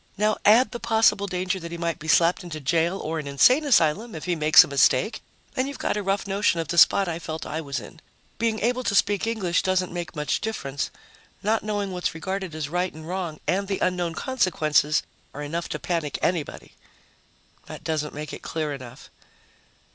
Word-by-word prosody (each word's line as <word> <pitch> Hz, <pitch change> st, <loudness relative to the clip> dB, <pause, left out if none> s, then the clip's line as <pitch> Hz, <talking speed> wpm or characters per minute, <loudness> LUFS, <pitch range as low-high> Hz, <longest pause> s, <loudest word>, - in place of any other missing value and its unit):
Now 210 Hz, +1 st, +2 dB
add 230 Hz, +5 st, +6 dB
the 240 Hz, -, -5 dB
possible 220 Hz, -3 st, +3 dB
danger 185 Hz, 0 st, -2 dB
that 170 Hz, -1 st, -8 dB
he 170 Hz, -, -5 dB
might 170 Hz, -1 st, -2 dB
be 155 Hz, -, -9 dB
slapped 170 Hz, +3 st, +3 dB
into 165 Hz, -3 st, -6 dB
jail 165 Hz, +6 st, +1 dB
or 160 Hz, +1 st, -3 dB
an 150 Hz, -, -6 dB
insane 250 Hz, -, +4 dB
asylum 215 Hz, -, +2 dB
if 160 Hz, -, -7 dB
he 180 Hz, -1 st, 0 dB
makes 155 Hz, -1 st, +7 dB
a -, -, -7 dB
mistake 140 Hz, -, +2 dB, 0.3 s
and 255 Hz, +1 st, 0 dB
you've 280 Hz, -, -6 dB
got -, -, -1 dB
a 210 Hz, -, -1 dB
rough 195 Hz, 0 st, -1 dB
notion 195 Hz, -3 st, +1 dB
of 165 Hz, -, -3 dB
the 170 Hz, 0 st, +3 dB
spot 195 Hz, +3 st, +6 dB
I 170 Hz, -1 st, -3 dB
felt 160 Hz, -1 st, -6 dB
I 155 Hz, +2 st, -4 dB
was 140 Hz, -2 st, -4 dB
in. 165 Hz, -, -12 dB, 0.4 s
Being 225 Hz, -1 st, 0 dB
able 245 Hz, +3 st, 0 dB
to 200 Hz, -, +1 dB
speak 205 Hz, +2 st, +2 dB
English 195 Hz, -7 st, 0 dB
doesn't 185 Hz, -1 st, 0 dB
make 175 Hz, -1 st, -5 dB
much 150 Hz, -1 st, -1 dB
difference; 140 Hz, -11 st, -3 dB, 0.5 s
not 215 Hz, +2 st, +1 dB
knowing 205 Hz, -2 st, -2 dB
what's 180 Hz, -2 st, -2 dB
regarded 190 Hz, +1 st, -4 dB
as 155 Hz, -2 st, -3 dB
right 180 Hz, +4 st, -1 dB
and 160 Hz, +1 st, -11 dB
wrong, 175 Hz, -4 st, -4 dB
and 195 Hz, +2 st, 0 dB
the 195 Hz, -1 st, -1 dB
unknown 175 Hz, -2 st, -1 dB
consequences, 155 Hz, -, +1 dB, 0.3 s
are 145 Hz, -, -5 dB
enough 165 Hz, +4 st, -4 dB
to -, -, -3 dB
panic 165 Hz, -5 st, -2 dB
anybody. 170 Hz, -4 st, -2 dB, 0.9 s
That -, -, -9 dB
doesn't 150 Hz, -2 st, -2 dB
make 150 Hz, 0 st, -6 dB
it -, -, -7 dB
clear 155 Hz, -2 st, -3 dB
enough. 130 Hz, -2 st, -11 dB
175 Hz, 200 wpm, -25 LUFS, 155-200 Hz, 0.9 s, makes